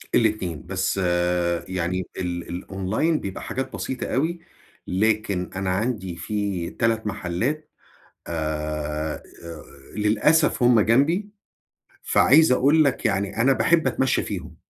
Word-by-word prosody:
ال2 95 - 0
بس - - -1 0.7
يعني 90 0 -2
ال 85 -2 -4
الأونلاين 95 - -1
بيبقى 95 -1 -6
حاجات 130 +1 -4
بسيطة 130 - -4
أوي، 165 +6 -1 0.5
لكن 100 -1 0
أنا 95 -1 -2
عندي 95 -3 -2
فيه 95 -1 -3
3 115 -1 +1
محلات 105 - -2 0.6
آآ، 75 -1 -3 0.7
للأسف 120 +8 +3
هم 120 -2 +6
جنبي 155 - +2 0.7
فعايز 155 -1 +5
أقول 145 +5 +4
لك 135 -2 0
يعني 100 +1 -1
أنا 135 +2 +5
باحب 155 +8 +2
أتمشّى 130 -1 +1
فيهم، 85 -5 -6
105 Hz, 110 wpm, -24 LUFS, 90-130 Hz, 0.7 s, هم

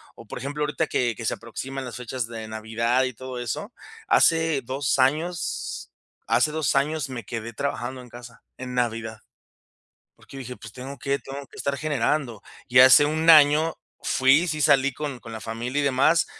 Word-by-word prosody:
o 115 - -13
por - - -7
ejemplo, 145 +3 -3
ahorita 150 +2 -1
que 120 -2 0
que 115 - -8
se - - 0
aproximan 130 +3 -7
las 125 - -7
fechas 125 0 -4
de 115 -1 -8
Navidad 115 +3 0
y 130 - -2
todo 130 +1 -8
eso. 120 -2 -4 0.4
Hace 160 -4 +3
2 135 +2 -1
años 155 +6 -1 0.3
hace 120 +6 +2
2 155 -2 0
años 145 +1 0
me 120 -3 -6
quedé 115 +2 -6
trabajando 130 0 -4
en 125 - -14
casa, 120 -1 -12 0.2
en 125 -1 -7
Navidad, 115 -2 -2 1.0
porque 135 - -13
dije: 125 -1 -7
"Pues - - -12
tengo 130 +2 -8
que 140 0 -1
tengo 140 +1 -8
que - - -18
estar 140 0 -1
generando". 140 -5 -1 0.3
Y 125 - +4
hace 130 +3 +9
un 155 +2 -1
año 155 +1 +6 0.3
fui 135 +6 +3
sí 155 -2 -1
salí 135 0 +4
con 145 -4 -5
con 115 - -11
la 110 - -7
familia 120 +5 -3
y - - 0
demás, 140 +5 +3
130 Hz, 185 wpm, -24 LUFS, 120-145 Hz, 1.0 s, hace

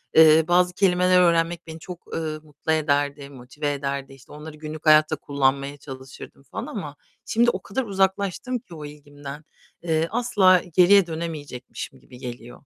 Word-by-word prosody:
eee, 160 0 +7
bazı 180 0 +3
kelimeler 180 -1 +4
öğrenmek 170 0 +1
beni 160 0 -8
çok, 175 +1 -10
ııı, 155 -1 -3
mutlu 150 +1 -5
ederdi, 145 -2 0
motive 140 +3 -4
ederdi. 140 -1 -4
İşte, 135 0 -17
onları 150 +1 -10
günlük 155 +1 -8
hayatta 155 0 +5
kullanmaya 140 0 -1
çalışırdım 135 0 -11
falan 220 - -6
ama 150 -9 -6 0.3
şimdi 240 +1 +3
o 190 - -2
kadar 255 +6 -3
uzaklaştım 200 +4 -1
ki 175 -6 -14
o 150 -1 -8
ilgimden, 145 0 -10 0.4
eee, 160 -1 +1
asla 205 -7 +4
geriye 185 +1 +6
dönemeyecekmişim 155 -6 -6
gibi 125 - -15
geliyor. 120 -1 -8
155 Hz, 150 wpm, -24 LUFS, 145-180 Hz, 0.4 s, eee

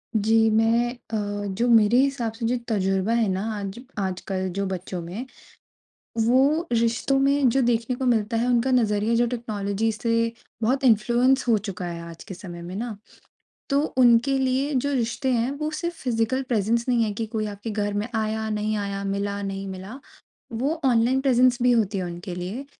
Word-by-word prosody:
जी। 225 +1 +4
मैं 225 +2 +3
अ, 205 -4 -4
जो 235 +5 0
मेरे 225 0 +5
हिसाब 265 -4 +1
से 230 0 -5
जो 245 +2 +1
तज़ुर्बा 195 0 0
है 230 -3 +2
ना 190 +2 -2 0.2
आज 200 +2 -6 0.2
आजकल 190 0 -2
जो 200 - -1
बच्चों 185 -1 -4
में, 180 +9 -6 1.0
वो 280 +8 +3
रिश्तों 235 +3 +1
में 275 0 +3
जो 270 +3 +2
देखने 240 0 +1
को 260 - -3
मिलता 230 -2 +1
है, 235 - +1
उनका 245 +1 +2
नज़रिया 220 -2 +2
जो 240 +1 +3
टेक्नोलॉजी 220 -2 -2
से 230 +1 0 0.3
बहुत 260 +5 +1
इन्फ्लुएंस 245 +3 +3
हो 230 -2 +4
चुका 195 -3 -5
है 170 -1 -5
आज 165 - -11
के - - -8
समय 175 -2 -9
में 175 +2 -7
ना। 225 0 -4 0.7
तो 280 +1 +3 0.2
उनके 250 +2 +5
लिए 265 +2 0
जो 280 +2 0
रिश्ते 250 +1 -1
हैं, 240 +2 +1
वो 300 +2 -3
सिर्फ़ 340 +2 -3
फ़िज़िकल 245 +1 0
प्रेज़ेंस 230 -1 0
नहीं 235 -2 +3
है 210 - -1
कि 225 +2 -3
कोई 215 0 -2
आपके 205 +2 -6
घर 205 -1 -1
में 205 +2 -1
आया, 220 0 -1
नहीं 215 0 -1
आया, 200 -1 -3
मिला, 200 +1 -2
नहीं 195 0 -4
मिला। 190 +7 -8 0.5
वो 275 +8 -1
ऑनलाइन 250 +1 +3
प्रेज़ेंस 255 -2 +3
भी 250 - +4
होती 215 -4 +1
है 185 - -1
उनके 175 +1 -6
लिए, 190 +10 -5
225 Hz, 185 wpm, -24 LUFS, 205-250 Hz, 1.0 s, मेरे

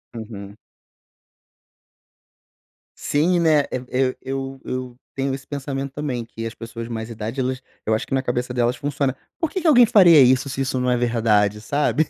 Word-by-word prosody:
Uhum. 105 -2 -8 2.4
Sim, 170 +5 +1
né. 155 -3 +4
E 125 0 -4
eu 130 0 +1
eu 135 0 -5
eu 125 -1 -5
tenho 135 0 -1
esse 135 - -11
pensamento 140 -1 -4
também 130 -6 -3
que 115 0 -6
as 115 - -8
pessoas 115 0 -7
de - - -9
mais 110 0 -5
idade, 115 +4 -5
elas 130 0 -1 0.2
eu 110 - +1
acho 110 - -1
que - - -5
na 135 0 +1
cabeça 125 0 -2
delas 120 0 +1
funciona, 140 0 -1 0.2
porque 345 +2 -1
que - - 0
alguém 245 -6 +7
faria 175 -8 +7
isso 130 +2 +4
se 135 +1 -3
isso 130 -1 -1
não 125 0 0
é 125 - +2
verdade, 110 -3 +2
sabe 150 +4 +1
130 Hz, 180 wpm, -22 LUFS, 115-140 Hz, 2.4 s, alguém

